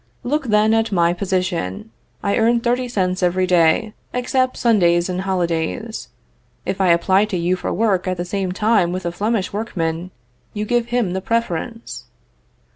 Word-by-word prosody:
Look, 290 +2 -1
then, 215 0 +3
at 225 0 +1
my 170 -3 +3
position. 185 - -2 0.3
I 200 - +1
earn 235 +1 +3
thirty 245 +1 0
cents 185 -5 -1
every 185 +1 +2
day, 180 +4 +3 0.2
excepts 255 +1 0
Sundays 175 -7 +3
and 185 0 -2
holidays. 185 +4 -2 0.6
If 190 +1 -2
I 190 - +3
apply 185 +4 +4
to 205 -4 -3
you 175 +2 +1
for 180 - -4
work 195 -4 +1
at 185 0 -1
the 175 - -3
same 190 0 -2
time 210 -2 +2
with 185 0 -4
a 170 - -1
Flemish 205 +2 -1
workman, 180 -5 -3 0.5
you 210 0 -2
give 240 +1 +1
him 240 -7 0
the 190 - -2
preference. 230 +1 -3
190 Hz, 165 wpm, -20 LUFS, 180-225 Hz, 0.6 s, apply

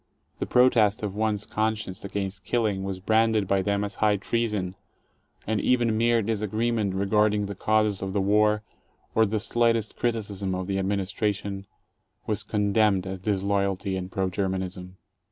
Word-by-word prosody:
The - - -2
protest 115 -4 +4
of 100 -2 -3
one's 105 -1 0
conscience 110 -3 -2
against 100 -1 -4
killing 105 -5 0
was 95 -1 -4
branded 110 0 +2
by 95 0 +2
them 100 +1 0
as 100 0 -4
high 105 -1 +4
treason, 105 -3 -1 0.7
and 110 -1 0
even 120 -3 +2
mere 115 0 +3
disagreement 110 -1 -1
regarding 105 +1 +2
the 100 - -5
causes 110 0 +1
of 95 0 -3
the 100 - 0
war, 105 +2 +3 0.5
or 110 0 +4
the 110 +1 -1
slightest 115 0 +1
criticism 100 -5 -1
of 90 0 -3
the 95 +1 -1
administration, 100 0 -2 0.6
was 105 -1 0
condemned 105 -2 +2
as 95 0 -5
disloyalty 100 0 0
and 95 0 -5
pro 95 0 0
Germanism. 95 -1 -3
105 Hz, 150 wpm, -26 LUFS, 95-110 Hz, 0.7 s, protest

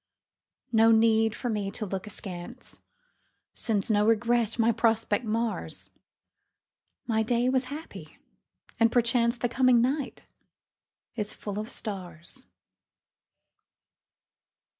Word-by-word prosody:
No 225 -1 +5
need 225 -1 +3
for 245 - -5
me 210 -4 -1
to 215 - -5
look 190 +1 -5
askance, 180 -4 -8 0.7
Since 215 -2 -1
no 205 -1 +3
regret 230 0 +2
my 230 0 +3
prospect 225 0 +1
mars. 225 +1 -3 1.1
My 220 -2 +1
day 240 +2 +1
was 260 0 +1
happy 295 +5 -9 0.6
and 230 0 +4
perchance 235 0 +2
The 245 - 0
coming 250 0 +4
night 265 +4 -1 0.9
is 210 -3 -3
full 205 -1 -5
of 215 +2 -5
stars. 185 +4 -8
225 Hz, 105 wpm, -27 LUFS, 210-240 Hz, 1.1 s, No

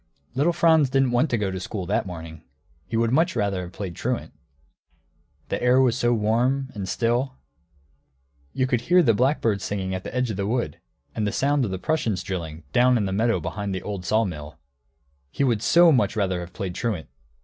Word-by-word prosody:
] 70 - -41
Little 145 +7 +2
Franz 160 -4 +4
didn't 135 -1 +2
want 120 +5 +2
to 120 - +1
go 100 -3 -1
to 95 - -4
school, 95 +1 -5
that 100 +1 0
morning. 80 -3 -8 0.5
He 115 - -2
would 115 0 +2
much 160 +6 +2
rather 100 -2 0
have 90 -1 -7
played 95 -2 -6
truant. - - -3 1.2
The - - -2
air 125 +1 +4
was 130 -3 +3
so 120 -2 +1
warm 120 +5 +1
and 95 -3 -5
still, 120 +5 0 1.2
you 130 - 0
could 125 -3 0
hear 175 +7 +4
the 115 -6 +4
blackbird 115 -4 +1
singing 95 -2 -3
at 95 0 -4
the 105 - -7
edge 125 -2 0
of 100 - -5
the 100 0 -1
wood, 115 - -2 0.3
and 105 -2 -1
the - - -1
sound 140 +2 +1
of - - -3
the 95 - -3
Prussians 110 - -1
drilling, 80 -4 -5
down 125 0 +4
in 105 - 0
the 95 - -2
meadow 115 +3 +2
behind 100 -2 -4
the 95 - -5
old 100 -3 -5
sawmill. 90 -7 -1 0.7
He 140 - -1
would 120 -6 +1
so 170 +6 +6
much 125 -4 +2
rather 95 -4 0
have 90 0 -7
played 95 -1 -5
truant! 100 -6 -3
110 Hz, 205 wpm, -24 LUFS, 95-125 Hz, 1.2 s, so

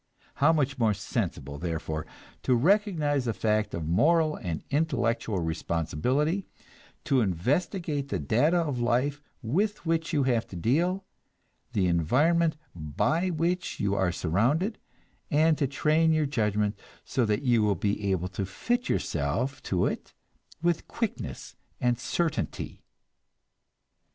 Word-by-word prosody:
How 150 +3 +5
much 140 -4 0
more 110 -3 +3
sensible, 85 - -3
therefore, 80 -2 -3 0.3
to 130 - +2
recognize 155 - +2
the 115 - -1
fact 105 -1 0
of 80 -2 -4
moral 155 - +3
and 85 -8 -4
intellectual 120 -8 0
responsibility; 85 - -1 0.6
to 135 -5 +2
investigate 140 - -1
the - - 0
data 125 - +2
of 150 -7 0
life 125 +5 +1 0.2
with 195 - 0
which 165 0 0
you 145 - +2
have 120 -3 +1
to - - -10
deal, 170 - +1 0.7
the 95 - +2
environment 150 - +2 0.2
by 85 - 0
which 175 +2 -1
you 100 -1 +1
are 95 -3 +1
surrounded, 125 - +1 0.5
and 155 +2 +4
to 140 - +2
train 155 +4 +2
your 155 -1 +2
judgment 105 -5 0 0.3
so 130 - 0
that 105 +2 0
you 120 -4 +3
will 105 -2 +2
be 100 0 -1
able 90 -1 -1
to 95 +2 -3
fit 240 - -2
yourself 115 - -1
to 90 -2 0
it - - -4 0.5
with 170 -1 +1
quickness 230 -3 -4 0.2
and 120 -1 +1
certainty! 155 +6 -2
125 Hz, 130 wpm, -28 LUFS, 100-160 Hz, 0.7 s, How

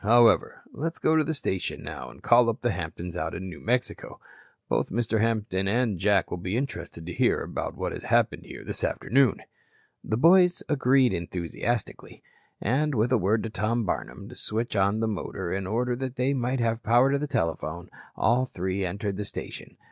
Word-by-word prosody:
However, 115 +2 +4
let's 165 +3 -3
go - - +2
into 160 -1 +4
the 160 - -1
station 95 -8 -3
now - - -6
and - - -16
call 120 0 +5
up 115 - -3
the 120 - +1
Hamptons 85 -1 -5
out 80 -2 -3
in 95 +2 -5
New 85 - -9
Mexico. 125 +2 -2 0.5
Both - - 0
Mr. 110 0 0
Hampton 105 -4 0
and 110 -3 +1
Jack 100 -1 +2
will 90 - -3
be 90 +5 -2
interested 85 -11 -5
to 90 - -5
hear - - +2
about - - -4
what - - -2
has - - -7
happened - - +2
here - - -9
this - - -4
afternoon." 130 -3 +2 0.6
The 110 - -1
boys 180 +5 +5
agreed 135 -3 +3
enthusiastically, 90 +7 -4 0.4
and 140 +6 +1
with 115 +3 +2
a 130 - +5
word 105 +4 +1
to 115 - -4
Tom 115 +2 0
Barnum 100 +1 -4
to 125 - -10
switch 115 +1 -2
on 100 +2 +2
the 115 - +1
motor 95 -3 -3
in 95 -1 -2
order 120 +4 0
that 130 -1 -4
they 135 +2 +1
might 130 0 -1
have 115 0 0
power 125 +5 +4
to 145 +1 -1
telephone, 85 - -2 0.2
all 125 +3 +2
three 95 -1 -2
entered 100 +2 -3
the 105 - -2
station. - - -7
115 Hz, 190 wpm, -27 LUFS, 95-125 Hz, 0.6 s, call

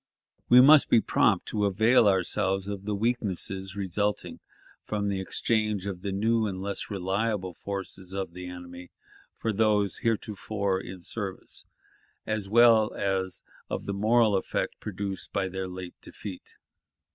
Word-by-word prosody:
We 125 +1 +9
must 145 +2 +7
be 115 - +6
prompt - - +2
to 105 -1 0
avail 110 +4 +4
ourselves 95 0 +1
of 100 -1 -5
the 105 -1 -1
weakness 105 -4 -1 0.2
resulting 100 +1 -2 0.4
from 100 -1 -2
the 95 -1 -1
exchange 110 0 -1
of 95 -3 -5
the 100 0 -3
new 110 +3 +1
and 95 -2 -4
less 100 +1 -4
reliable 95 0 -1
forces 95 0 -6
of 95 -3 -4
the 90 0 -7
enemy, 90 0 -9 0.5
for 110 - -1
those 105 -1 +2
heretofore 105 -4 -1
in 95 -2 -9
service, 100 0 -7 0.6
as 110 -3 -2
well 115 -1 +6
as 95 -1 -1 0.3
of - - -4
the 100 - -2
moral 110 +1 +3
effect 95 - -2
produced 100 -2 -5
by 95 -1 0
their 95 0 -4
late 90 -1 -7
defeat.... 95 -4 -9
100 Hz, 145 wpm, -27 LUFS, 95-110 Hz, 0.6 s, We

